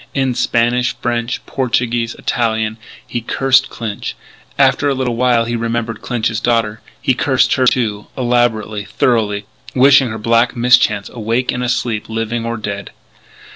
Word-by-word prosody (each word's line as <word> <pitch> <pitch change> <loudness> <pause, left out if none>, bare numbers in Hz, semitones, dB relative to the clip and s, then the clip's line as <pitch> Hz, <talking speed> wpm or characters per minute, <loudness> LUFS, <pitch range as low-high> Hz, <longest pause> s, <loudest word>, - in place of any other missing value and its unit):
In 135 -2 +1
Spanish, 120 +1 +1
French, 120 0 -2
Portuguese, 120 -2 -1
Italian, 110 -2 -1 0.3
he 120 - -4
cursed 135 +3 +2
Clinch. 110 -3 -5 0.4
After 145 - +3
a 140 - 0
little 130 -2 -1
while 120 -1 +2
he 120 +1 -2
remembered 115 -1 -2
Clinch's 115 -3 -1
daughter, 115 -3 0
and - - -23
he 130 - +1
cursed 130 +1 +2
her, 130 -2 +2 0.5
elaborately, 120 -4 0
thoroughly, 105 -1 0 0.3
wishing 135 0 +6
her 110 - -5
black 115 +2 +2
mischance 120 -4 +3
awake 115 +2 -1
and 125 - -3
asleep, 120 -3 -1
living 115 +1 -2
or 115 0 -2
dead. 100 -2 -5
120 Hz, 140 wpm, -17 LUFS, 110-125 Hz, 0.5 s, wishing